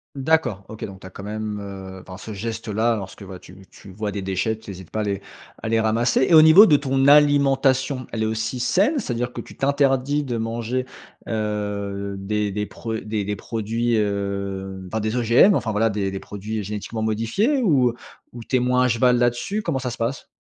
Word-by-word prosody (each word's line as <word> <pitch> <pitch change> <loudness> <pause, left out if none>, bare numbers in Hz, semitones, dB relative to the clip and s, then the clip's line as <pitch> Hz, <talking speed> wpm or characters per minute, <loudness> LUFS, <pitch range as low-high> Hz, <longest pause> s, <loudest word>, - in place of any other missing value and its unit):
D'accord, 135 -8 +1
OK, 110 - -6
donc 95 -1 -10
tu 95 - -11
as - - -10
quand 95 - -10
même, 105 0 -4
heu 95 -2 -8
enfin 95 -1 -9
ce 110 +2 -8
geste 115 +3 -5
là, 110 +2 +1
lorsque, 100 +1 -8
voilà, 95 -1 -9
tu 95 +1 -15
tu 100 - -14
vois 105 +2 -4
des 100 - -4
déchets, 95 +4 -1
tu 105 - -13
hésites 95 -3 -9
pas 110 - -3
à - - 0
les 100 -1 -2 0.4
à 110 - -2
les 115 - +2
ramasser. 115 +4 +2
Et 165 - +6
au 155 - +9
niveau 170 +8 +9
de 150 - +6
ton 135 -1 +1
alimentation, 140 -2 +4
elle 110 - -3
est 110 - +1
aussi 110 +3 -2
saine? 205 - +2
C'est-à-dire 125 - -3
que - - -5
tu - - -14
t'interdis 140 +1 +1
de 120 -4 -3
manger, 115 +3 -2 0.4
heu, 105 -2 -3
des 105 +1 -1
des 105 +1 -3
pro 115 -1 -6
des 105 -2 -3
des 105 +1 -2
produits, 115 +2 -1
heu 100 -2 -3
enfin, 110 +4 -3
des 110 +2 -2
OGM, 125 - +5
enfin, 110 - -1
voilà, 110 +2 +2
des 100 -2 -2
des 95 - -4
produits 105 +2 -5
génétiquement 105 +2 -5
modifiés? 115 - +1
Ou 130 - +3 0.4
ou 120 - -8
tu 130 - 0
es - - +2
moins 125 +1 +2
à - - +3
cheval 125 +1 +3
là-dessus? 120 - 0
Comment 155 -7 -1
ça 125 -1 -3
se 120 - -7
passe? 120 +4 -3
110 Hz, 215 wpm, -22 LUFS, 100-130 Hz, 0.4 s, au